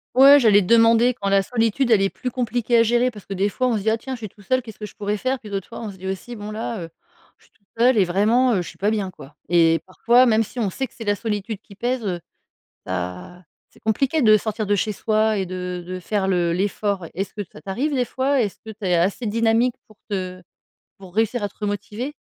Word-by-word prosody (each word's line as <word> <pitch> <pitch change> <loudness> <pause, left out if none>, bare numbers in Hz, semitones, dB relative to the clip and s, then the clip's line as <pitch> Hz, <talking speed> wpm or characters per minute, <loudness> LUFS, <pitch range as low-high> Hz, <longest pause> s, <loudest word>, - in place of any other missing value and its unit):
Ouais, 275 +2 +9
j'allais 210 -5 +5
te 180 - -4
demander 230 +2 +5
quand 200 -4 -5
la 195 0 +3
solitude, 235 +3 0
elle 215 -3 +5
est 195 - +2
plus 250 - -5
compliquée 240 -1 0
à 230 - +6
gérer 240 +2 +2
parce 210 -4 -13
que, 195 - -5
des 195 +2 +1
fois, 255 +5 -1
on 240 - +1
se 210 - -2
dit: 215 - +1
«Ah 220 - +2
tiens, 265 +3 -6
je - - -11
suis 215 -2 -6
tout 205 - -20
seul, 255 +6 +1
qu'est-ce 225 -4 -12
que 210 - -5
je - - -12
pourrais 205 0 -2
faire?», 260 +4 -1
puis 215 - -11
d'autres 195 -2 -4
fois, 230 - -9
on 220 -3 -5
se 190 - -14
dit 190 +1 -7
aussi: 195 +6 -5
«Bon, 210 0 -7
là, 220 0 -4
heu, 165 - -8 0.5
je - - -29
suis - - -36
tout - - -37
seul 240 +1 +4
et 195 - +5
vraiment, 220 +8 +3
heu, 190 - +1
je 175 - -7
suis - - -14
pas 205 +2 +1
bien, 200 -4 -2
quoi». 145 -5 -14
Et 165 -1 +4
parfois, 235 +7 +4
même 225 -2 +3
si 220 - -13
on 220 -5 0
sait 265 +8 -3
que - - -28
c'est 240 - -7
la 205 -1 +1
solitude 210 0 -3
qui 200 - -16
pèse, 245 +2 -2
heu, 180 -3 -2 0.6
bah, 90 - -5 0.3
c'est - - -23
compliqué 275 +8 +1
de 215 -3 +6
sortir 215 +1 -3
de 205 0 +2
chez 210 +2 -1
soi 215 +1 +1
et 190 - -1
de 180 -1 -5
de 185 +1 -5
faire 195 +1 -1
le 175 -2 +1
l'effort, 200 +1 -1
ouais. 165 - -9
Est-ce 195 +3 -3
que 210 - -5
ça - - -12
t'arrive 255 +10 -2
des 255 -2 +1
fois? 265 +2 +1
Est-ce 205 -4 -3
que - - -8
tu 210 -1 -8
es 180 -1 +2
assez 190 +8 0
dynamique 230 +3 +2
pour 215 - -20
te 185 -2 -4 0.6
pour 185 -1 -13
réussir 225 +2 +1
à 205 - -2
te - - -28
remotiver? 210 +6 -4
215 Hz, 270 wpm, -22 LUFS, 195-235 Hz, 0.6 s, Ouais